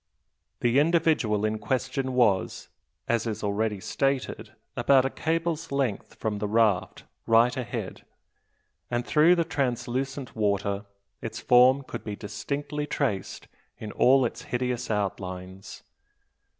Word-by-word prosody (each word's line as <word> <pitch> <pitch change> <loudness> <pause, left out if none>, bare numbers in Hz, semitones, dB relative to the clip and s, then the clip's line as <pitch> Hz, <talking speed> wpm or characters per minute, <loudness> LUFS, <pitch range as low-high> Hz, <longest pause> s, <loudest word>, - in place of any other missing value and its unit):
The 120 +3 +3
individual 150 -10 +2
in 110 0 -1
question 130 +4 -2
was, 115 -7 +1 0.4
as 115 0 0
is 110 -1 -4
already 105 0 -1
stated, 135 +2 -2 0.2
about 135 -2 +4
a 135 - -1
cable's 165 0 -2
length 135 -7 -2
from 105 -2 -3
the 105 - -2
raft, 105 -4 +1 0.2
right 115 +3 +4
ahead; 120 -6 -5 0.9
and 120 0 -1
through 160 +4 +5
the 170 - +2
translucent 135 -1 -2
water 100 -1 -1 0.3
its - - -5
form 125 +3 +5
could - - -7
be 105 - -5
distinctly 145 +8 -4
traced 130 -10 -2 0.3
in 105 - -7
all 130 +3 +4
its 115 - -4
hideous 125 0 -2
outlines. 95 -2 -4
120 Hz, 125 wpm, -27 LUFS, 105-135 Hz, 0.9 s, through